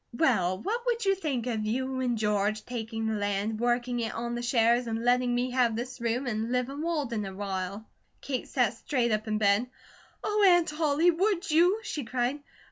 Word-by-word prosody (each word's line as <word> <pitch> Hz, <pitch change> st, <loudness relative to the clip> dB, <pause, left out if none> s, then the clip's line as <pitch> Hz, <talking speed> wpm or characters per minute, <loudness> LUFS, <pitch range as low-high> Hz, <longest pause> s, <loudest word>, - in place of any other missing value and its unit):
"Well, 190 Hz, -, +2 dB
what 455 Hz, +5 st, -2 dB
would 470 Hz, -2 st, 0 dB
you 390 Hz, -, +4 dB
think 295 Hz, -11 st, -2 dB
of 225 Hz, -4 st, -2 dB
you 260 Hz, +4 st, -2 dB
and 245 Hz, -2 st, 0 dB
George 210 Hz, 0 st, 0 dB
taking 225 Hz, -2 st, -4 dB
the 220 Hz, -, 0 dB
land, 205 Hz, +1 st, -1 dB
working 240 Hz, +1 st, 0 dB
it 230 Hz, -, -3 dB
on 235 Hz, +1 st, -3 dB
the 240 Hz, -, -3 dB
shares, 240 Hz, 0 st, +2 dB
and 225 Hz, +1 st, -3 dB
letting 245 Hz, 0 st, +3 dB
me 250 Hz, +1 st, 0 dB
have 245 Hz, -3 st, +2 dB
this 245 Hz, +1 st, -5 dB
room, 235 Hz, +3 st, -1 dB
an' 225 Hz, -1 st, -2 dB
live 250 Hz, 0 st, 0 dB
in 280 Hz, +2 st, -6 dB
Walden, 290 Hz, -10 st, -1 dB
awhile?" 195 Hz, +1 st, -4 dB, 0.3 s
Kate 265 Hz, -3 st, -4 dB
sat -, -, +1 dB
straight 250 Hz, -6 st, -1 dB
up 215 Hz, +1 st, -1 dB
in 215 Hz, 0 st, 0 dB
bed: 205 Hz, +3 st, +3 dB, 0.6 s
"Oh, 425 Hz, 0 st, +1 dB
Aunt 350 Hz, -4 st, +5 dB
Ollie! 315 Hz, +2 st, +4 dB
Would 375 Hz, 0 st, 0 dB
you?" 355 Hz, +7 st, +4 dB
she 300 Hz, -, -4 dB
cried. 250 Hz, +3 st, -1 dB
245 Hz, 195 wpm, -28 LUFS, 220-285 Hz, 0.6 s, Aunt